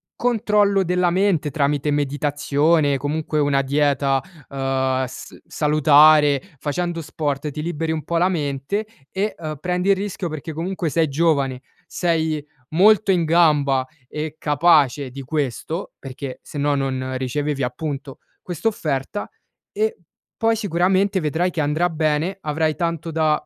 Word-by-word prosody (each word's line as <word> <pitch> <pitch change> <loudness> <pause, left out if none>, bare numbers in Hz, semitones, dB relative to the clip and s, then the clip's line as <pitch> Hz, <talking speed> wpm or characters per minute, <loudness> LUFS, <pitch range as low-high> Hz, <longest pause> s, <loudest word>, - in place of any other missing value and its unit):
controllo 210 -4 +2
della 180 0 +1
mente 180 -4 +1
tramite 145 0 0
meditazione, 145 +1 +1
comunque, 150 +2 -2
una 145 -2 +2
dieta, 140 -1 +1 0.3
uhm, 130 -1 0
s 130 - -10
salutare, 150 -1 +5 0.2
facendo 170 +4 -2
sport 150 -1 -3
ti 150 - -5
liberi 160 0 -2
un 155 -2 -4
po' 170 - -1
la 175 +2 +3
mente, 150 +4 -2 0.2
e, 205 +3 -2
uhm, 155 -2 -5
prendi 180 +3 -1
il 200 - +6
rischio 195 -2 -4
perché 155 0 -6
comunque, 170 +2 -3
sei 160 +3 +2
giovane, 140 -4 +1 0.3
sei 160 -4 -1 0.3
molto 205 +4 +5
in 175 -3 +2
gamba 150 -5 +3 0.2
e 150 +2 -5
capace 145 -3 +3
di 135 +2 -7
questo, 150 - -3
perché 135 0 -7
sennò 145 0 -1
non 130 -1 -2
ricevevi 140 +2 -2
appunto, 135 +1 -4 0.2
quest'offerta 175 -3 -3 0.4
e 440 +2 0 0.5
poi 225 0 +3
sicuramente, 190 -1 +1
vedrai 165 +3 0
che 165 - -2
andrà 155 +4 +1
bene, 160 +3 -1
avrai 155 +1 0
tanto 165 -2 -2
da 155 -1 +1
155 Hz, 135 wpm, -21 LUFS, 140-175 Hz, 0.5 s, il